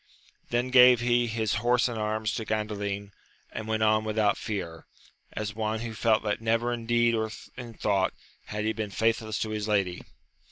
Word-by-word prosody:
Then 120 +2 0
gave 125 -1 +8
he 120 0 +2
his 110 -1 -1
horse 120 +1 +3
and 120 - -4
arms 110 0 -1
to 115 - -3
Gandalin, 105 -2 -3 0.4
and 110 - -6
went 110 0 0
on 110 0 +3
without 110 -1 +1
fear, 85 -7 -5 0.5
as 105 -1 -4
one 110 0 -2
who 115 -1 -5
felt 110 0 +2
that 105 0 -1
never 115 +2 +1
in 115 -1 -6
deed 120 0 +3
or 110 -1 0 0.3
in 120 -3 -8
thought 100 -3 0 0.3
had 105 0 -4
he 110 - +1
been 110 -2 -4
faithless 110 +1 0
to 110 - -2
his 105 0 -3
lady. 95 -4 0
110 Hz, 185 wpm, -27 LUFS, 105-115 Hz, 0.5 s, gave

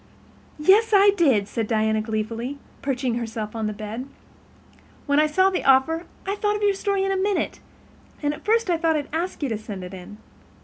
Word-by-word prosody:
"Yes, 400 +9 +4
I 400 +1 +7
did," 265 - +3
said 225 +1 -3
Diana 220 -1 +1
gleefully, 225 +4 -3 0.2
perching 255 -3 -1
herself 220 -2 -5
on 220 -1 -2
the - - -2
bed. 215 +5 -6 1.0
"When 285 0 +3
I 305 - +4
saw 375 +5 +3
the 370 - -2
offer 275 +6 +3 0.2
I 390 +1 -1
thought 415 0 0
of 420 - -3
your 405 -1 +4
story 390 0 -1
in 390 - 0
a - - +1
minute, 390 +1 -1 0.6
and 290 0 +1
at - - -11
first 445 -2 +2
I 340 - +2
thought 325 -1 +1
I'd 290 -2 -3
ask 335 -1 -3
you 275 - 0
to 220 -2 -2
send 205 -4 -7
it 180 +1 -8
in. 190 +3 -10
285 Hz, 205 wpm, -24 LUFS, -, 1.0 s, I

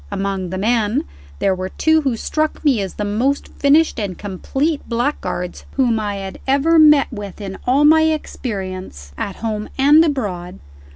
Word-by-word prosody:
Among 195 -2 -3
the 185 - -4
men, 220 +1 +1 0.3
there 195 - +1
were 185 0 -4
two 315 +9 +2
who 270 -5 0
struck 310 +6 -2
me 260 -8 +3
as 195 - -5
the 210 - -3
most 240 +8 -1
finished 295 0 +2
and 195 -4 -4
complete 270 - -2
blackguards 230 -8 -2
whom 240 -4 +2
I 205 -1 -3
had 195 -1 -7
ever 290 +5 +3
met 300 -3 +6
with 205 -3 -7
in 195 -2 -7
all 275 +4 +4
my 315 +1 +6
experience, 190 - -4
at 195 - -4
home 215 -2 -4
and 290 +4 +6
abroad. 200 - -3
225 Hz, 165 wpm, -19 LUFS, 195-285 Hz, 0.3 s, met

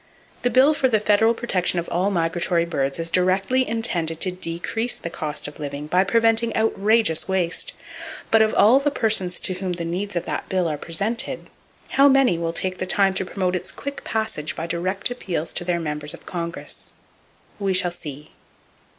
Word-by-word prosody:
The 245 - +2
bill 265 +5 +5
for 265 -3 +1
the 220 -3 +3
federal 215 +2 +3
protection 185 -7 0
of 170 - -2
all 180 +4 +1
migratory 170 -1 +1
birds 140 -5 -1
is 165 0 -3
directly 190 +9 +2
intended 175 -8 -1
to 185 - +2
decrease 180 +7 -3
the 170 - -6
cost 150 -3 -3
of 145 - -10
living, 145 0 -5
by 180 +5 +3
preventing 225 +2 +2
outrageous 220 -4 +2
waste; 190 - 0 0.6
but 225 - +6
of 220 0 +4
all 235 +6 +6
the 285 +1 +1
persons 215 -9 0
to 185 - +1
whom 185 0 -3
the 170 -1 -4
needs 180 +4 -3
of 175 - -1
that - - -4
bill 185 -2 +1
are 155 - -1
presented, 200 +10 -3 0.4
how 275 +1 +5
many 270 -10 +4
will 165 -1 -1
take 185 +2 -2
the 185 - -2
time 195 0 +3
to 190 - -1
promote 185 -1 -1
its 180 - -4
quick 280 0 -7
passage 195 -8 -2
by 165 - -4
direct 185 +6 -1
appeals 175 -10 -3
to - - 0
their 175 -1 0
members 150 -2 -3
of - - -18
Congress? 170 -1 -5 0.7
We 195 -2 0
shall 180 -1 +3
see. 150 -4 -9
185 Hz, 185 wpm, -23 LUFS, 170-220 Hz, 0.7 s, but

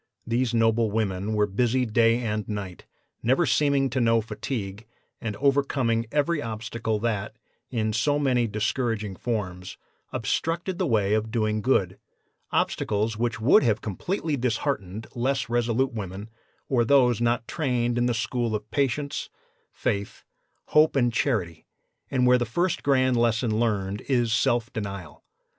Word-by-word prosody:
These 120 +1 0
noble 115 -1 +2
women 105 -1 -1
were 105 0 +3
busy 120 +5 +1
day 115 +1 +3
and 105 -3 -3
night, 100 -4 -6 0.3
never 130 +9 +3
seeming 140 0 +2
to 130 +1 0
know 115 -1 +4
fatigue, 110 -1 -5 0.3
and 110 -2 -3
overcoming 135 -3 +1
every 150 +2 +1
obstacle 110 -1 -3
that, 110 -4 -2 0.3
in 110 -3 -1
so 130 +7 +2
many 125 -5 +2
discouraging 110 -1 -1
forms, 95 -5 -4 0.3
obstructed 170 +2 -2
the 185 - +1
way 105 -5 +2
of 110 +1 0
doing 110 -2 0
good 95 -6 +1 0.5
obstacles 110 +2 0
which 115 +1 -1
would 110 +5 +5
have 110 -6 +1
completely 155 - -2
disheartened 115 -5 -2
less 125 -1 -1
resolute 120 +2 +1
women, 100 0 -6 0.4
or 125 -3 +2
those 125 -2 +4
not 120 -1 +1
trained 125 -6 0
in 120 0 +2
the 120 - 0
school 115 0 -1
of 105 0 -6
patience, 140 +1 -1 0.4
faith, 100 0 -3 0.5
hope 155 0 +4
and 120 -3 +2
charity, 95 - -1 0.4
and 125 -2 +2
where 125 0 +5
the 120 - 0
first 175 +9 0
grand 130 -2 +3
lesson 115 -1 +1
learned 105 -3 -1
is 120 -4 +2
self 120 +1 +1
denial. 100 -6 -6
115 Hz, 145 wpm, -26 LUFS, 110-130 Hz, 0.5 s, would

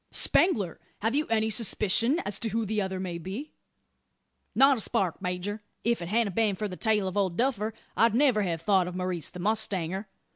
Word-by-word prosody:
"Spangler! 200 - +2 0.2
have 225 +2 +1
you 300 +2 0
any 220 -1 +1
suspicion 230 - +2
as 200 -1 -1
to 225 - -1
who 225 +1 -1
the 215 +1 -1
other 190 -1 -3
may 180 -2 -4
be?" 200 - -6 1.0
"Not 270 0 +6
a - - -3
spark, 185 -4 -1
major. 185 +3 -3 0.2
If't 235 -5 0
hadn't 215 -2 +1
been 215 -3 +2
for 210 +3 -3
the 185 - -7
tale 210 -1 +1
of 185 - -4
Old 190 -4 0
Duffer 230 -4 0 0.2
I'd 230 -1 +3
never 255 -5 +4
have 170 -5 -2
thought 190 -1 +3
of 180 - -6
Maurice 180 -4 -2
the 180 - -10
mustanger. 195 -2 -1
205 Hz, 190 wpm, -28 LUFS, 185-225 Hz, 1.0 s, Not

